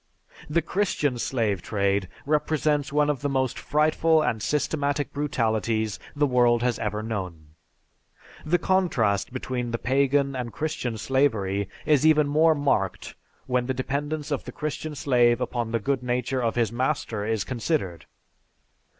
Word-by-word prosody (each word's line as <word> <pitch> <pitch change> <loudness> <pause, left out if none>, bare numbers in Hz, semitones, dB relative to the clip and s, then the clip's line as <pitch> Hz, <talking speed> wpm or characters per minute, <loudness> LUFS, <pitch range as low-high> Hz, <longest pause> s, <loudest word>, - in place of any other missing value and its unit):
The 165 +2 +1
Christian 150 -11 0
slave 110 -8 0
trade 100 -2 0 0.2
represents 150 -1 +1
one 150 0 +3
of 145 -2 -1
the 145 - -1
most 130 -2 0
frightful 155 +1 +2
and 110 -7 -1
systematic 145 0 -1
brutalities 110 -6 -1 0.2
the 145 0 +3
world 120 -3 +3
has 125 -2 0
ever 105 0 -2
known. 90 -8 -5 0.9
The 170 +3 +2
contrast 165 - +1
between 125 -1 -3
the 115 - -1
Pagan 140 +2 +1
and 125 -2 -4
Christian 130 -7 -3
slavery 105 -6 0 0.2
is 150 -3 +3
even 155 -2 +5
more 155 +2 +4
marked 135 -10 -1 0.3
when 125 -1 0
the 130 - -1
dependence 145 +4 -3
of 145 - -2
the - - -6
Christian 155 0 -4
slave 120 -4 +3
upon 120 -2 -2
the 115 - +2
good 135 +3 -1
nature 125 +1 -1
of 115 -2 0
his 115 -3 +1
master 120 -4 -1
is 110 -2 0
considered. 115 - -2
130 Hz, 145 wpm, -25 LUFS, 115-150 Hz, 0.9 s, even